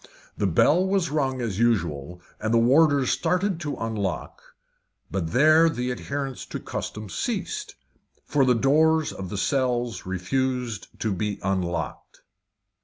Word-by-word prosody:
The 100 - 0
bell 150 - +4
was 190 -4 +1
rung 135 -4 0
as 110 -5 -3
usual, 90 -7 0 0.2
and 110 - -2
the 115 - +4
warders 140 +2 +4
started 180 +7 0
to 145 -4 -3
unlock, 105 -4 -3 0.7
but 85 -4 -2
there 155 - +5
the 125 -5 -2
adherence 135 +1 -4
to - - -5
custom 105 0 -5
ceased, 405 - -3 0.5
for 145 -2 +2
the 125 -1 +4
doors 155 +5 +3
of 95 -2 -6
the 105 - -4
cells 120 -2 0
refused 120 +4 -2
to 110 -3 0
be 105 +1 -2
unlocked. 85 -6 -3
125 Hz, 135 wpm, -25 LUFS, 100-150 Hz, 0.7 s, there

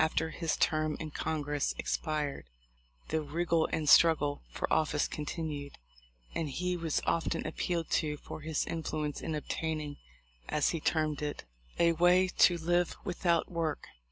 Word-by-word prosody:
After 160 0 0
his 165 0 -1
term 155 -1 +1
in 155 -1 -5
Congress 150 -2 -1
expired 150 - -2 0.6
the 160 0 +1
"wriggle 165 +2 +1
and 155 -2 -1
struggle" 150 -3 +5
for - - -3
office 150 -1 +2
continued; 150 -2 -4 0.6
and 160 -3 -2
he 180 +6 -1
was 165 -3 -1
often 165 - 0
appealed 170 -2 -2
to 150 -1 +1
for 155 - -9
his 155 -1 -1
influence 155 -2 -3
in 160 - -2
obtain 160 +1 -2
ing, 145 -1 -6 0.5
as 150 - +2
he 165 - -1
termed 155 -2 0
it, 150 -1 -3 0.3
"a 170 0 +5
way 175 +3 +5
to 175 -1 +5
live 175 +1 +1
without 175 -3 +1
work." 165 -3 -2
160 Hz, 150 wpm, -31 LUFS, 150-170 Hz, 0.6 s, struggle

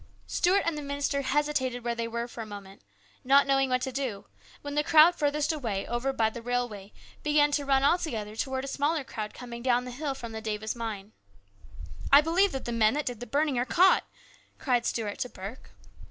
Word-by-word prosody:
Stuart 375 +3 +2
and 335 -2 0
the 300 - -5
minister 280 0 -1
hesitated 265 -3 0
where 235 0 -1
they 230 0 -3
were 235 +1 -3
for 235 - -8
a - - -5
moment, 200 -2 -10 0.4
not 275 +2 +5
knowing 270 -1 +2
what 255 0 +1
to 265 - -2
do, 250 -7 -4 0.4
when 285 0 -5
the 295 +1 +1
crowd 320 +2 +7
farthest 295 -2 0
away, 225 -10 -3
over 240 +3 -1
by 225 -4 +1
the 235 - -8
railway, 235 -5 -3 0.3
began 295 -1 +3
to 285 0 0
run 270 -1 +3
all 335 +6 +4
together 215 -10 -4
towards 265 +3 -2
a 275 - -5
smaller 295 +1 0
crowd 215 -4 -6
coming 235 -1 -8
down 250 0 +1
the 250 - -6
hill 275 +2 -3
from 235 -3 -7
the 220 0 -6
Davis 215 0 -3
mine. 220 -3 -5 0.5
" 80 +2 -12
I 280 - +10
believe 340 +6 +2
the 265 -3 -4
men 225 +1 +3
that 300 - -1
did 245 -3 -4
the 245 - -7
burning 285 -3 +1
are - - +2
caught! 355 +9 +4 0.3
" - - -33
cried 245 -4 0
Stuart 210 -3 -3
to 250 - -2
Burke. 200 +6 -9
255 Hz, 215 wpm, -28 LUFS, 230-290 Hz, 0.5 s, I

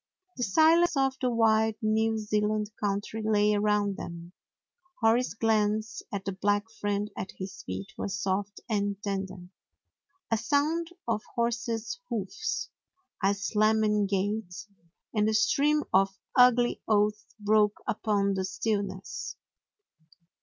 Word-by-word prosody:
The - - -6
silence 320 - +4
of 270 -1 +2
the 255 - +2
wide 220 -2 +3
New 220 +1 +1
Zealand 210 0 0
country 205 +2 -2
lay 210 -1 +3
around 205 -1 +1
them. 170 +1 -8 0.7
Hori's 230 +2 +2
glance 215 -1 +1
at 200 -1 -4
the 195 - -1
black 205 +3 0
friend 205 -1 -2
at 190 - -5
his 190 0 -7
feet 95 +1 -6
was 200 0 -3
soft 195 +1 -2
and 205 -3 0
tender. 190 -3 -4 0.8
A 225 - +3
sound 305 +7 +1 0.2
of 220 -2 0
horse's 235 - -1
hoofs, 225 - -3 0.5
a 200 +1 +3
slamming 210 0 +2
gate, 200 -1 -2 0.5
and 210 -1 +2
a 220 - +1
stream 290 +7 +3
of 195 +1 +3 0.2
ugly 245 -1 +5
oaths 210 0 +1
broke 210 0 +3
upon 200 -2 +1
the 190 -1 -1
stillness. 200 -1 -3
210 Hz, 125 wpm, -28 LUFS, 200-225 Hz, 0.8 s, ugly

